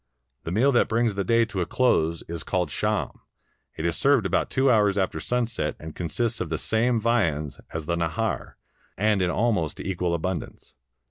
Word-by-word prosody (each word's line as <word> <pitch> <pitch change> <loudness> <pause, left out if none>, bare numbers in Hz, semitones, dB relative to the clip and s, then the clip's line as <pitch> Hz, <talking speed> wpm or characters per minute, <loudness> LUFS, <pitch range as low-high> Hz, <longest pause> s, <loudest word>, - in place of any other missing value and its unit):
The 80 - -3
meal 120 +9 +3
that 120 - +3
brings 115 -1 +1
the 100 0 -1
day 115 +4 +3
to 100 -4 -3
a 85 - -1
close 85 -10 +1
is 85 -1 -4
called 90 -5 -1
sham: - - -1 0.6
it 80 - -4
is 85 0 +1
served 140 -6 +3
about - - +1
two 130 0 +3
hours 105 -3 +3
after 95 -2 0
sunset, 115 -10 -1
and 80 0 -9
consists 115 +8 -2
of 80 - -3
the 80 - -1
same 115 +5 +1
viands 85 - 0
as 80 -1 -4
the 85 +2 0
nahar 85 +7 -2 0.4
and 105 0 +2
in 90 - +2
almost 105 -7 0
equal 90 -2 -1
abundance. 85 0 -5
95 Hz, 185 wpm, -25 LUFS, 85-115 Hz, 0.6 s, meal